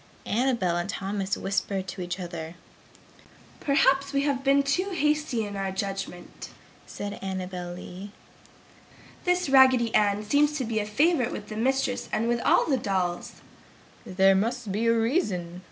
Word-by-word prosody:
Annabel 230 -7 +1
and 175 +2 -3
Thomas 195 0 -2
whispered 195 -1 -2
together, 175 -3 -6 1.0
"Perhaps 275 0 +2
we 275 0 +1
have 280 -2 -1
been 275 +1 +4
too 360 +8 0
hasty 300 - 0
in 205 0 -6
our 195 -1 -2
judgment!" 195 -2 -5 0.4
said 205 0 -6
Annabel 185 -2 -5
Lee. 185 +2 -9 1.2
"This 360 -1 +1
Raggedy 260 -4 +5
Ann 205 0 +2
seems 290 +6 +3
to 275 -4 -2
be 220 -1 -1
a 210 - -3
favorite 285 +3 +2
with 210 - -7
the 215 - -6
mistress 255 +2 0
and 225 +2 0
with 235 0 0
all - - +4
the 280 -5 +1
dolls!" 185 -6 -2 0.6
"There 190 +1 +3
must 225 +2 -1
be 220 +4 0
a 230 - +5
reason!" 195 - -1
215 Hz, 145 wpm, -26 LUFS, 190-270 Hz, 1.2 s, Raggedy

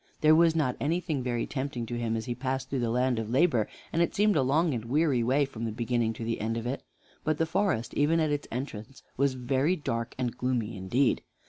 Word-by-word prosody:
There 155 0 +6
was 165 0 +5
not 130 -6 +1
anything 160 -1 -1
very 120 -2 -1
tempting 130 -3 -3
to 120 - -6
him 115 -1 -1
as 110 - -4
he 120 - -2
passed 130 +1 -3
through 135 - 0
the 120 -1 0
land 125 0 +1
of 110 -1 -4
Labor, 125 -4 +3 0.2
and 165 - +2
it 170 - +1
seemed 210 0 +3
a 150 - +4
long 150 +5 +2
and 115 -2 -3
weary 140 0 +2
way 135 +5 +2
from 115 -4 -7
the 115 - -2
beginning 120 0 0
to 115 - -7
the 115 -1 -2
end 115 +1 -1
of 115 - -4
it. 125 +3 -2 0.4
But 155 -1 0
the 165 - +2
forest, 170 - 0
even 155 +3 +3
at 155 -2 +1
its 145 0 -2
entrance, 125 -1 -6
was 135 0 +1
very 130 +7 +1
dark 115 -7 -3
and 125 -2 -2
gloomy 120 -3 -1
indeed. 120 +8 +1
130 Hz, 235 wpm, -29 LUFS, 115-150 Hz, 0.4 s, There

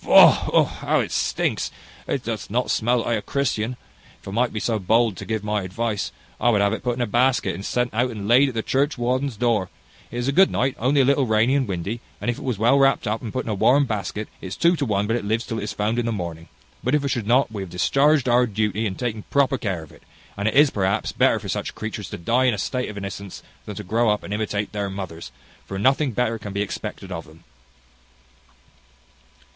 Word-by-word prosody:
Faugh! - - +6 0.2
how - - +1
it - - -2
stinks! - - 0 0.4
It - - -1
doth - - -4
not - - 0
smell 120 +2 +2
like 115 -1 0
a - - -8
Christian. 120 -1 -1 0.4
If - - -16
I - - -5
might 120 +4 +1
be 110 - -3
so 110 0 0
bold 110 +2 +2
to - - -7
give 110 -2 -2
my 105 0 0
advice, 100 - -2 0.3
I 120 - +3
would 105 -4 +3
have 100 +1 +2
it - - -3
put 125 -1 -1
in 120 - -1
a - - +1
basket, 125 +4 +2
and 95 - -7
sent 125 +3 -1
out 125 +3 +1
and 105 -4 -6
laid 130 +5 +5
at 125 - -8
the 110 - -1
churchwarden's 130 -2 0
door. 110 -5 +1 0.4
It 120 - -7
is 120 +1 -1
a - - +2
good 190 +7 +5
night, 130 +1 0
only 135 +4 +3
a - - +3
little 140 -1 +3
rainy 110 +4 +3
and 140 -3 +1
windy; 100 +5 -3 0.2
and 120 - 0
if 120 - -7
it - - -8
was 125 -5 -1
well 120 +6 +4
wrapt 135 0 +3
up, 110 +2 -1
and 115 - -5
put 130 - -3
in - - -5
a - - 0
warm 135 +8 +4
basket, 110 -2 -3
it - - -6
is 95 - -6
two 170 +1 +4
to 145 - -1
one 100 -1 +1
but 115 +2 0
it 120 - -2
lives 110 +3 -1
till 115 - -3
it - - -4
is - - -4
found 110 +3 0
in 120 - -1
the - - 0
morning. 85 -5 -5 0.4
But - - +2
if 150 - +1
it - - 0
should 120 -6 -2
not, 125 +1 +3
we 105 -3 -5
have 95 - -6
discharged 140 - +2
our 125 0 +4
duty 110 0 -1
in 95 - -4
taking 115 -2 -3
proper 140 -2 +2
care 95 -7 -2
of 80 - -15
it; - - -18 0.3
and 100 +1 -2
it 110 - 0
is, 145 0 +6
perhaps, 95 -1 0
better - - +3
for - - -7
such - - -3
creatures 110 -2 -5
to - - -6
die 120 +9 +1
in 125 -4 +3
a - - -7
state 125 +5 -2
of 105 - -8
innocence, 100 0 -7 0.2
than 105 - -6
to 105 - -6
grow 115 +4 +1
up 105 0 0
and 100 - -5
imitate 105 -1 -2
their 100 -2 -2
mothers; 90 -8 -7 0.4
for 95 - -5
nothing 135 +6 +2
better 115 -1 0
can 105 -2 -7
be 100 +1 0
expected 95 0 -6
of 85 -2 -5
them." 80 +2 -17
110 Hz, 250 wpm, -23 LUFS, 100-125 Hz, 0.4 s, Faugh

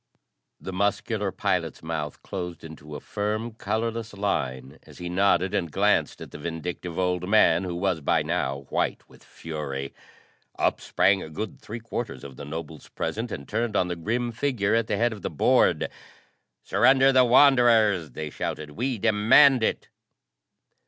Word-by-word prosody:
The 95 - -7
muscular 100 +2 -1
pilot's - - -2
mouth 80 -2 -4
closed 90 -3 -6
into 75 -2 -10
a - - -5
firm, 110 +3 -3
colorless 115 0 -3
line 65 -10 -3
as - - -16
he 90 0 -6
nodded 95 0 +2
and 85 -3 -1
glanced 105 +4 +1
at - - -9
the - - -9
vindictive 85 +2 -5
old 90 0 -1
man 95 -4 +4
who 90 -1 -4
was 90 -2 -1
by - - +2
now 70 +1 -2
white - - -1
with - - -19
fury. 70 -4 -6 0.6
Up - - +1
sprang 95 0 +2
a - - -7
good 105 +8 -6
three 115 +3 -7
quarters 115 0 -5
of 70 -2 -9
the 70 - -8
nobles 80 0 -7
present 115 +1 -4
and 70 - -6
turned 110 0 -2
on 90 -2 +2
the 90 - -2
grim 120 +8 -2
figure 115 -4 0
at 115 -1 +2
the 105 - -1
head 120 +1 +1
of 105 - -10
the - - -3
board. 75 - +3 0.8
"Surrender 130 +6 +4
the 130 -1 +5
Wanderers!" 120 - +5
they 75 -1 -5
shouted. 75 0 -4
"We 125 - -2
demand 115 +6 +5
it!" - - -1
100 Hz, 165 wpm, -25 LUFS, 80-115 Hz, 0.8 s, the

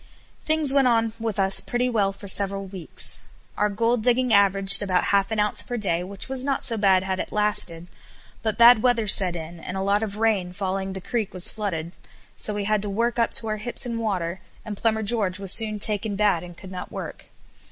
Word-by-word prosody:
Things 310 -3 +2
went 275 -2 +3
on 225 -2 +1
with 225 -2 -4
us 195 0 +4
pretty 245 +1 -1
well 210 -5 0
for 195 +1 -12
several 195 0 +2
weeks. 185 -3 -3 0.3
Our 210 - 0
gold 230 +3 0
digging 245 +1 +1
averaged 200 -1 +4
about 185 -3 0
half 200 -1 +2
an 220 - -3
ounce 210 0 +1
per 245 - -5
day, 180 -5 +1
which 195 +1 -6
was 265 -1 -3
not 275 0 -2
so 230 - +3
bad 195 -3 +2
had 190 -1 -3
it - - -5
lasted; 205 -5 +1 0.5
but 220 -2 -2
bad 235 -1 +7
weather 235 -3 +1
set 185 -3 +3
in 165 +1 -8
and, 185 +3 -7
a - - -3
lot 200 +1 +1
of 210 -2 -5
rain 210 -5 0
falling, 190 0 -4
the 190 - -7
creek 215 0 -4
was 180 - +2
flooded, 170 -7 -4 0.4
so 210 - -1
we 205 - -2
had 215 0 0
to 205 - -5
work 235 +4 -1
up 230 - +1
to 225 - +1
our 215 0 -2
hips 235 +4 -1
in 235 -2 -4
water, 185 -5 -3 0.3
and 215 -2 -6
Plumber 220 +1 -1
George 200 -4 +1
was 195 -1 +2
soon 215 -2 +4
taken 210 0 0
bad 200 -4 +1
and 175 0 -12
could 190 -2 -12
not 185 - -8
work. - - -8
205 Hz, 220 wpm, -23 LUFS, 190-225 Hz, 0.5 s, bad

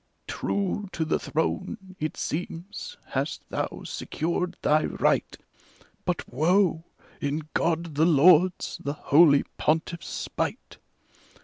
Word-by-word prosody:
True, 200 0 -2
to 160 - -1
the 160 - +1
throne, 185 +4 -3
it 155 0 -3
seems, 175 - -5
hast - - -3
thou - - -3
secured 175 +2 -2
thy 155 +1 +3
right; - - +1 0.7
But, - - -1
woe! 165 +4 +2 0.4
in 150 +2 -2
God 170 -1 0
the 155 +3 +3
Lord's, 175 +3 +4
the 140 - -2
Holy 150 -1 +5 0.2
PontiflPs 160 +1 0
spite. - - -4
165 Hz, 110 wpm, -26 LUFS, 155-180 Hz, 0.7 s, Holy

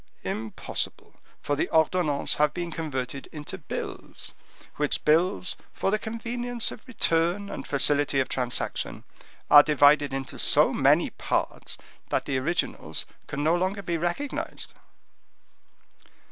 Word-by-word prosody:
"Impossible, 110 0 -3 0.3
for 145 - 0
the 145 - -1
ordonnances 160 -2 +2
have 150 0 +2
been 175 -1 -3
converted 140 -4 -4
into 150 +4 -7
bills, 150 - -6 0.4
which 150 0 0
bills, 180 +5 +3 0.2
for 195 - -1
the 215 - +1
convenience 235 +2 -2
of - - -9
return 180 -3 +1
and - - -6
facility 145 0 +3
of 130 - +1
transaction, 125 -2 -2 0.5
are 145 - +11
divided 145 -1 +4
into 135 -1 -5
so - - +6
many - - +3
parts - - -2 0.3
that - - 0
the 135 -1 0
originals 170 +7 -1 0.2
can 145 - -3
no 160 +3 +4
longer 190 +3 -1
be 170 -1 -1
recognized." 175 - -3
160 Hz, 125 wpm, -27 LUFS, 145-185 Hz, 0.5 s, are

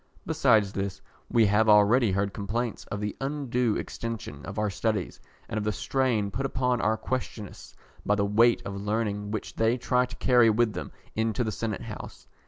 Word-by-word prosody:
Besides 105 -2 +3
this, 100 -1 -3 0.3
we 115 -2 +4
have 105 +2 +3
already 105 +2 +5
heard 100 +1 0
complaints 110 +3 -3
of 105 - -5
the 105 -1 -3
undue 130 -5 0
extension 110 -11 -5
of 100 - -7
our 105 -1 0
studies, 105 -2 -2 0.3
and 110 - -2
of - - -3
the 105 - 0
strain 115 -3 0
put 135 - -3
upon 125 -3 0
our 110 +1 +2
questionists 115 -5 -5 0.3
by 105 - +2
the 100 -1 +1
weight 115 +4 +4
of 100 - -4
learning 105 -1 -1
which 110 +1 -5
they 115 +2 +2
try 125 0 +1
to - - -10
carry 120 -3 +4
with 110 0 +2
them - - -6 0.2
into 110 +2 0
the 110 - -2
Senate 105 +1 -3
House. - - -9
110 Hz, 185 wpm, -27 LUFS, 105-120 Hz, 0.3 s, already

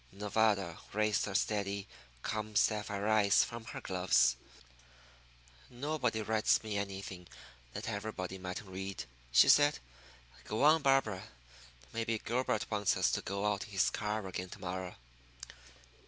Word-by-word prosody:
Nevada 100 -3 +1
raised 105 0 +2
her 100 - -5
steady, 100 -1 0 0.4
calm, 110 -1 -3
sapphire 105 -1 +1
eyes 105 -2 +5
from 115 -1 -7
her - - -7
gloves. 65 -10 +3 1.3
"Nobody 125 -4 -1
writes 110 +1 +2
me 110 -2 -4
anything 95 -3 -5 0.5
that - - -5
everybody 100 -4 -4
mightn't 90 +2 -6
read," 95 -7 -5 0.3
she - - +7
said. 145 0 +6 0.7
"Go 110 +5 -1
on, 155 +2 +6
Barbara. 135 -9 +2 0.7
Maybe 115 0 -1
Gilbert 120 +4 -1
wants 105 -2 +1
us - - +3
to - - 0
go 100 +1 -3
out 105 -1 0
in - - -14
his 100 -2 +2
car 105 0 -2
again 90 0 -5
to 100 - -10
morrow." 95 -1 -5
105 Hz, 135 wpm, -33 LUFS, 95-110 Hz, 1.3 s, she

